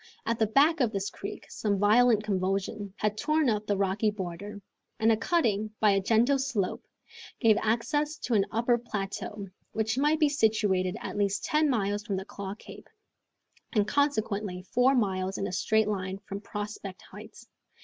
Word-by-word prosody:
At 230 Hz, 0 st, -1 dB
the 220 Hz, -, +3 dB
back 295 Hz, +8 st, +4 dB
of 245 Hz, -5 st, +2 dB
this 195 Hz, -2 st, -3 dB
creek -, -, -7 dB
some 205 Hz, -2 st, -1 dB
violent 215 Hz, +2 st, +4 dB
convulsion 195 Hz, +1 st, -2 dB
had 210 Hz, 0 st, -1 dB
torn 305 Hz, -4 st, +2 dB
up 210 Hz, -1 st, -2 dB
the 205 Hz, -, +1 dB
rocky 200 Hz, +2 st, +1 dB
border, 205 Hz, +1 st, -6 dB, 0.4 s
and 220 Hz, +1 st, +4 dB
a -, -, +5 dB
cutting, 215 Hz, -, 0 dB
by 210 Hz, -1 st, +5 dB
a 195 Hz, 0 st, +2 dB
gentle 235 Hz, +7 st, +3 dB
slope, 240 Hz, -9 st, -2 dB, 0.6 s
gave 225 Hz, -4 st, +5 dB
access 295 Hz, +8 st, 0 dB
to 250 Hz, -, -3 dB
an 200 Hz, -3 st, +3 dB
upper 235 Hz, +2 st, +1 dB
plateau, 205 Hz, -2 st, -5 dB, 0.3 s
which 220 Hz, +3 st, 0 dB
might 300 Hz, +2 st, +2 dB
be 305 Hz, -, +5 dB
situated 210 Hz, -8 st, +1 dB
at -, -, -5 dB
least 200 Hz, 0 st, 0 dB
ten 305 Hz, -1 st, +2 dB
miles 205 Hz, -4 st, 0 dB
from 200 Hz, -2 st, -2 dB
Claw 200 Hz, 0 st, -6 dB
Cape, -, -, -13 dB, 0.8 s
and 210 Hz, -3 st, +2 dB
consequently 215 Hz, -10 st, 0 dB
four 250 Hz, +7 st, +3 dB
miles 190 Hz, -4 st, 0 dB
in 195 Hz, -, -2 dB
a -, -, -3 dB
straight 220 Hz, +3 st, +2 dB
line 190 Hz, -2 st, -2 dB
from 195 Hz, +1 st, -6 dB
Prospect 205 Hz, -2 st, -6 dB
Heights. 215 Hz, +4 st, -12 dB
215 Hz, 170 wpm, -28 LUFS, 200-235 Hz, 0.8 s, a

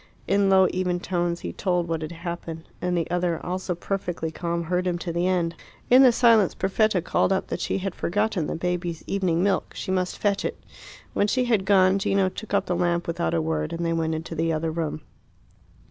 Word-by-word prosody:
In 200 Hz, +1 st, +2 dB
low, 190 Hz, -1 st, +6 dB
even 180 Hz, -1 st, -1 dB
tones 175 Hz, -1 st, -1 dB
he -, -, -5 dB
told 180 Hz, -3 st, 0 dB
what 165 Hz, -1 st, -2 dB
had 155 Hz, +1 st, -5 dB
happened; 170 Hz, -1 st, -6 dB
and 180 Hz, 0 st, 0 dB
the 165 Hz, -, 0 dB
other, 175 Hz, -2 st, 0 dB
also 180 Hz, 0 st, -2 dB
perfectly 175 Hz, -3 st, -3 dB
calm, 170 Hz, +1 st, -2 dB
heard 180 Hz, +2 st, -1 dB
him 175 Hz, -1 st, 0 dB
to 170 Hz, -1 st, -4 dB
the 175 Hz, +2 st, +1 dB
end. 175 Hz, -3 st, +1 dB, 0.4 s
In 255 Hz, +2 st, +8 dB
the 260 Hz, -2 st, +8 dB
silence 230 Hz, -5 st, +4 dB
Perfetta 195 Hz, -1 st, +1 dB
called 185 Hz, -, +1 dB
up 190 Hz, -, +1 dB
that -, -, -3 dB
she -, -, -1 dB
had 195 Hz, -1 st, -3 dB
forgotten 205 Hz, -3 st, -1 dB
the -, -, -3 dB
baby's 175 Hz, -1 st, -3 dB
evening 185 Hz, -3 st, 0 dB
milk; 200 Hz, -1 st, 0 dB
she 190 Hz, -, -4 dB
must 185 Hz, -1 st, -1 dB
fetch 200 Hz, -1 st, 0 dB
it. -, -, -3 dB, 0.5 s
When 205 Hz, -, +2 dB
she 255 Hz, +4 st, +1 dB
had 220 Hz, -6 st, +1 dB
gone 190 Hz, -1 st, +4 dB
Gino 195 Hz, -1 st, +2 dB
took 220 Hz, +3 st, -9 dB
up 200 Hz, -1 st, +2 dB
the 180 Hz, -, -1 dB
lamp 175 Hz, 0 st, 0 dB
without 85 Hz, -, -1 dB
a 80 Hz, -, +2 dB
word, 80 Hz, -1 st, -1 dB
and 170 Hz, 0 st, -2 dB
they 165 Hz, -, +1 dB
went 160 Hz, -1 st, 0 dB
into 165 Hz, +1 st, -5 dB
the 165 Hz, +1 st, 0 dB
other 160 Hz, 0 st, -1 dB
room. 155 Hz, -1 st, -3 dB
180 Hz, 215 wpm, -25 LUFS, 170-195 Hz, 0.5 s, In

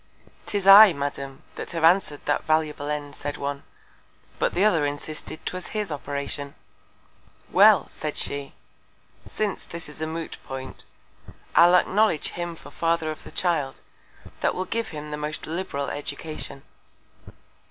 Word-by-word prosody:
'Tis 200 Hz, -3 st, -2 dB
I, 200 Hz, 0 st, +10 dB
Madam, 140 Hz, -2 st, -5 dB
that -, -, -7 dB
have 165 Hz, -1 st, -2 dB
answered 165 Hz, -3 st, +4 dB
that 145 Hz, -, +1 dB
valuable 155 Hz, -2 st, 0 dB
End, 145 Hz, -1 st, -4 dB
said 145 Hz, 0 st, -4 dB
one; 140 Hz, 0 st, -3 dB, 0.8 s
but -, -, +1 dB
the 190 Hz, +4 st, +3 dB
other 170 Hz, -8 st, +3 dB
insisted 145 Hz, +2 st, -5 dB
'twas 185 Hz, 0 st, -4 dB
his 210 Hz, -5 st, -2 dB
Operation. 140 Hz, 0 st, -4 dB, 1.0 s
Well! -, -, +6 dB
said -, -, -5 dB
she, 140 Hz, -1 st, -3 dB, 0.7 s
since 210 Hz, -2 st, -2 dB
this 170 Hz, 0 st, -7 dB
is 150 Hz, +1 st, -10 dB
a 160 Hz, -, -1 dB
Moot 160 Hz, 0 st, -5 dB
point, 135 Hz, 0 st, -7 dB, 0.7 s
I'll 175 Hz, +1 st, +7 dB
acknowledge 195 Hz, -2 st, +3 dB
him 175 Hz, -1 st, -5 dB
for -, -, -13 dB
the -, -, -19 dB
Father 165 Hz, -1 st, +1 dB
of 155 Hz, -, -8 dB
the -, -, -11 dB
Child, 160 Hz, -7 st, 0 dB, 0.6 s
that -, -, +1 dB
will 185 Hz, -, -2 dB
give 230 Hz, +4 st, -2 dB
him 150 Hz, -5 st, -7 dB
the 150 Hz, -, -3 dB
most 150 Hz, +1 st, -4 dB
liberal 155 Hz, -4 st, -3 dB
Education. 145 Hz, -1 st, -5 dB
155 Hz, 150 wpm, -25 LUFS, 145-175 Hz, 1.0 s, I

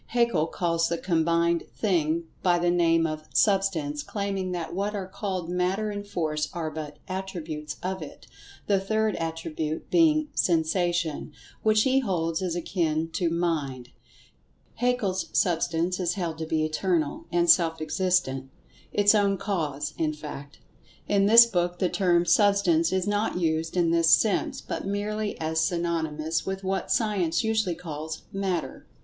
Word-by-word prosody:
Haeckel 235 Hz, -10 st, +2 dB
calls 165 Hz, -1 st, 0 dB
this 170 Hz, 0 st, -2 dB
combined 170 Hz, -1 st, +1 dB
"thing" 170 Hz, -5 st, +1 dB, 0.2 s
by 175 Hz, -1 st, +3 dB
the 175 Hz, 0 st, +2 dB
name 165 Hz, -1 st, +3 dB
of 155 Hz, -1 st, -4 dB
"Substance," 185 Hz, -8 st, +2 dB
claiming 195 Hz, +1 st, -3 dB
that 170 Hz, -2 st, -4 dB
what 200 Hz, +3 st, -2 dB
are 195 Hz, -2 st, -3 dB
called 185 Hz, -3 st, -4 dB
Matter 185 Hz, +4 st, -1 dB
and 205 Hz, 0 st, -6 dB
Force 155 Hz, -6 st, -2 dB
are 160 Hz, -2 st, -3 dB
but 150 Hz, -1 st, -7 dB
"attributes" 170 Hz, -5 st, -5 dB
of 190 Hz, 0 st, -3 dB
it, 150 Hz, -, -10 dB, 0.4 s
the 200 Hz, -2 st, +2 dB
third 215 Hz, +2 st, 0 dB
"attribute" 160 Hz, -1 st, -4 dB
being 310 Hz, -3 st, +4 dB
"Sensation," 170 Hz, -2 st, 0 dB, 0.3 s
which 215 Hz, 0 st, +3 dB
he 265 Hz, 0 st, +3 dB
holds 170 Hz, -8 st, -1 dB
is 180 Hz, -3 st, -2 dB
akin 165 Hz, -2 st, -1 dB
to 170 Hz, +1 st, -1 dB
Mind—"Haeckel's 170 Hz, -, -3 dB
Substance" 170 Hz, +1 st, +1 dB
is 175 Hz, -1 st, 0 dB
held 170 Hz, -5 st, -3 dB
to 160 Hz, -, -4 dB
be 155 Hz, -1 st, +1 dB
Eternal, 155 Hz, -1 st, -1 dB
and 175 Hz, 0 st, +2 dB
Self 165 Hz, -2 st, +4 dB
existent—its 175 Hz, +3 st, 0 dB
own 200 Hz, -2 st, +2 dB
Cause, 150 Hz, -7 st, -3 dB
in 155 Hz, -1 st, +1 dB
fact. 150 Hz, -2 st, -9 dB, 0.5 s
(In 200 Hz, -1 st, +3 dB
this 230 Hz, +2 st, +9 dB
book 175 Hz, -5 st, -1 dB
the 180 Hz, 0 st, +1 dB
term 175 Hz, -3 st, +2 dB
"Substance" 190 Hz, -5 st, +3 dB
is 190 Hz, -1 st, 0 dB
not 205 Hz, -1 st, 0 dB
used 160 Hz, 0 st, -1 dB
in 170 Hz, -2 st, +3 dB
this 165 Hz, -1 st, +3 dB
sense, 195 Hz, +6 st, +3 dB
but -, -, -5 dB
merely 205 Hz, +1 st, -2 dB
as 160 Hz, 0 st, -1 dB
synonymous 160 Hz, -2 st, -1 dB
with 190 Hz, 0 st, -4 dB
what 190 Hz, 0 st, -2 dB
Science 190 Hz, -7 st, +1 dB
usually 220 Hz, -5 st, 0 dB
calls 155 Hz, -1 st, -6 dB
"Matter.") 190 Hz, -4 st, -3 dB
175 Hz, 145 wpm, -26 LUFS, 160-195 Hz, 0.5 s, this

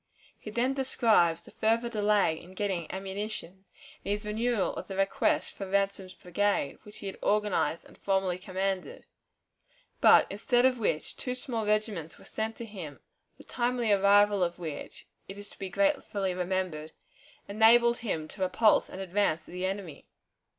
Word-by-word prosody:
He -, -, -8 dB
then 240 Hz, +5 st, 0 dB
describes 220 Hz, -11 st, +2 dB
the -, -, -15 dB
further 230 Hz, +2 st, +1 dB
delay 210 Hz, -7 st, +1 dB
in 185 Hz, +2 st, -14 dB
getting 190 Hz, -5 st, -2 dB
ammunition, 195 Hz, -1 st, -6 dB, 0.4 s
and 200 Hz, -, -3 dB
his 210 Hz, +1 st, -2 dB
renewal 220 Hz, 0 st, 0 dB
of -, -, -6 dB
the 195 Hz, -, -6 dB
request 195 Hz, 0 st, +1 dB
for 195 Hz, -2 st, -7 dB
Ransom's 195 Hz, -1 st, -1 dB
brigade, 180 Hz, -4 st, -1 dB
which 210 Hz, -, -12 dB
he -, -, -9 dB
had 195 Hz, -, -6 dB
organized 205 Hz, -6 st, +1 dB
and -, -, -17 dB
formerly 190 Hz, -2 st, 0 dB
commanded, 190 Hz, -, -3 dB, 0.9 s
but, -, -, +7 dB
instead 245 Hz, +5 st, +2 dB
of 255 Hz, -2 st, +3 dB
which, 165 Hz, -8 st, -1 dB
two 250 Hz, -1 st, -4 dB
small 235 Hz, -5 st, -4 dB
regiments 210 Hz, -7 st, -1 dB
were -, -, -17 dB
sent 220 Hz, +1 st, -3 dB
to 235 Hz, -, -7 dB
him, 180 Hz, -10 st, -8 dB, 0.4 s
the -, -, -14 dB
timely 240 Hz, -2 st, 0 dB
arrival 200 Hz, 0 st, +5 dB
of 175 Hz, 0 st, -2 dB
which, 160 Hz, -4 st, -7 dB, 0.2 s
it 195 Hz, -, -8 dB
is 205 Hz, 0 st, -11 dB
to -, -, -18 dB
be 195 Hz, -1 st, -4 dB
gratefully 210 Hz, -7 st, 0 dB
remembered, 180 Hz, -4 st, -3 dB, 0.5 s
enabled 235 Hz, +3 st, +5 dB
him 165 Hz, -10 st, -3 dB
to 195 Hz, -, -10 dB
repulse 205 Hz, +4 st, +3 dB
an 185 Hz, -, -8 dB
advance 190 Hz, -4 st, 0 dB
of -, -, -12 dB
the 180 Hz, +1 st, -2 dB
enemy. 190 Hz, -6 st, -6 dB
200 Hz, 165 wpm, -29 LUFS, 185-220 Hz, 0.9 s, but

